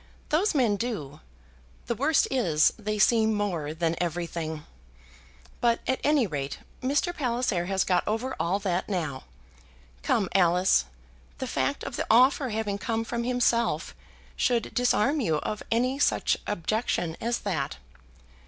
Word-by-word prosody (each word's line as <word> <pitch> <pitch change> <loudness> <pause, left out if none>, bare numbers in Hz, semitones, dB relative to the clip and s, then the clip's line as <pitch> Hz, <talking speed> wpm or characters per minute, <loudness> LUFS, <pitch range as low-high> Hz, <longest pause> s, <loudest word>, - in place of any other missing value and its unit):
"Those 335 +5 +2
men 235 -7 +3
do. 165 - -4 0.7
The - - -1
worst 280 +6 +2
is, 170 - +3
they 215 0 -2
see 220 +2 +4
more 200 -8 -1
than 165 +1 0
everything. 165 -2 -3 0.9
But, 235 -1 +2
at 260 - +1
any 290 -4 +3
rate, 140 -6 -4 0.2
Mr. 290 +7 0
Palliser 235 - 0
has 190 0 +1
got 180 -2 +1
over 230 +5 -1
all 170 +4 +1
that 185 -1 -1
now. 160 - -3 0.8
Come, 195 - +1
Alice; 180 - +4 0.5
the - - -3
fact - - -1
of - - -5
the - - -2
offer 255 +3 +5
having 210 -2 -2
come 225 +2 -1
from 235 +1 -3
himself 240 -1 +1 0.4
should 240 -3 0
disarm 245 +4 +2
you 160 -10 +1
of 210 - -4
any 250 +4 +1
such - - +2
objection 190 -3 -1
as 235 +1 0
that. 160 -9 -2
215 Hz, 140 wpm, -27 LUFS, 175-245 Hz, 0.9 s, offer